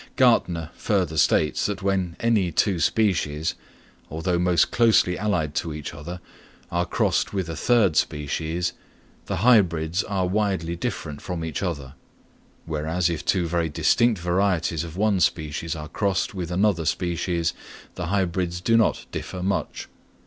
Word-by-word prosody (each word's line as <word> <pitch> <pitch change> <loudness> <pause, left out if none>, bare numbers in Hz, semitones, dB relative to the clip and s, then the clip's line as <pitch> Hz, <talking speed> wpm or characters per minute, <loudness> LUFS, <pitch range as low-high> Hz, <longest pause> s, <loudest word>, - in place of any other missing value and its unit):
Gärtner 90 - +3
further 90 -7 -1
states 75 +2 +2
that 100 -2 -4
when 95 -3 0
any 110 -6 +2
two 95 +2 +1
species, 80 -5 +1 0.6
although 85 +3 -1
most 90 -2 +3
closely 110 -6 +4
allied 90 -7 -1
to 80 -1 -2
each 75 - -6
other, 85 +4 -7 0.5
are 85 0 0
crossed - - 0
with 95 -4 -1
a 80 - -5
third 105 -3 +3
species, 80 +4 -1 0.5
the - - -1
hybrids 90 -7 +4
are 95 -3 -1
widely 95 -3 0
different 75 -3 -4
from 90 -3 -4
each 80 -3 -4
other; 70 -8 -4 0.7
whereas 80 +3 -1
if 80 - -4
two 90 -3 +1
very 85 -1 0
distinct 115 +8 +2
varieties 85 -2 0
of 85 +1 -8
one 105 -1 +2
species 80 0 -1
are 75 -1 -6
crossed 95 +4 -1
with 90 -4 -4
another 90 -2 +1
species, 85 0 -1 0.4
the - - -4
hybrids 90 -2 -1
do 115 +6 +2
not 115 - +2
differ 90 -1 -5
much. 95 +1 -2
90 Hz, 145 wpm, -24 LUFS, 80-95 Hz, 0.7 s, closely